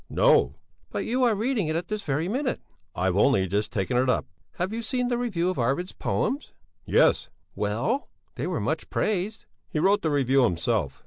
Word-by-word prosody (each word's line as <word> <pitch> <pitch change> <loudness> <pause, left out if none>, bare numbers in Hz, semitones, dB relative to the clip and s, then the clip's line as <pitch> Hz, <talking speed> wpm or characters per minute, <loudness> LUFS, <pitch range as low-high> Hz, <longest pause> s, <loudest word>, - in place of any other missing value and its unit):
"No!" - - +4 0.3
"But - - -3
you 255 +2 +1
are 230 -3 +3
reading 220 -3 0
it 155 - -1
at 170 +1 -2
this 215 -1 -3
very 155 -1 -1
minute!" 255 +5 -1 0.4
"I've 90 0 +1
only 100 -1 +4
just 100 +3 -1
taken 105 +5 0
it 130 +1 +2
up." - - +1 0.3
"Have 185 +4 -2
you 230 - -2
seen 250 +2 -1
the 240 - +1
review 185 -7 0
of 185 - -5
Arvid's 135 +10 0
poems?" 280 +3 -2 0.3
"Yes." - - +3 0.2
"Well? 115 - -1 0.2
They - - -3
were - - -1
much - - -2
praised." 210 +2 -1 0.2
"He - - -3
wrote 195 +6 +3
the 160 - 0
review 135 -2 +3
himself." 85 -8 0
175 Hz, 190 wpm, -26 LUFS, -, 0.4 s, No